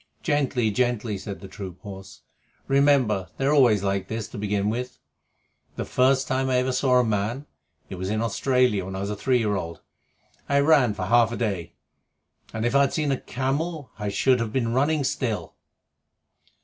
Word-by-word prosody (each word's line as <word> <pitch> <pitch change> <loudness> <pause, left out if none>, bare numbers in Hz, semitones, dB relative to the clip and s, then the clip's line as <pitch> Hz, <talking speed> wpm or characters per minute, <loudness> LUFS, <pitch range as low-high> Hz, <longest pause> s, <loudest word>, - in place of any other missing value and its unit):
"Gently, 130 -7 +1
gently!" 120 -2 0
said 100 0 -7
the 95 - -8
troop 95 -2 -8
horse. 95 -2 -10 0.5
"Remember 135 -8 +3
they 135 - -1
are 145 - +3
always 120 -9 +4
like 100 -1 -1
this 110 -3 -4
to - - -8
begin 105 0 0
with. 125 +2 -4 0.8
The - - -4
first 130 +1 +2
time 130 0 0
I 130 - +1
ever 125 +1 +1
saw 130 0 +2
a 125 - +5
man 110 +5 -1 0.4
(it 95 - -8
was 95 +1 -3
in 110 +1 0
Australia 115 -2 +1
when 95 +1 -6
I 95 - -4
was 100 +1 -3
a - - -3
three 125 +5 +1
year 105 -3 0
old) 85 -3 -5 0.7
I 140 0 +3
ran 140 -7 +4
for - - -3
half 120 -1 +4
a 120 - -4
day, 100 -8 -3 0.8
and 110 +1 -3
if 120 - 0
I'd 140 0 +3
seen 150 -3 0
a 135 - -1
camel, 140 +4 -3
I 105 -1 -2
should 125 +5 +2
have 115 -2 -2
been 115 -2 -1
running 145 +3 +2
still." 120 -4 -2
120 Hz, 190 wpm, -25 LUFS, 105-135 Hz, 0.8 s, a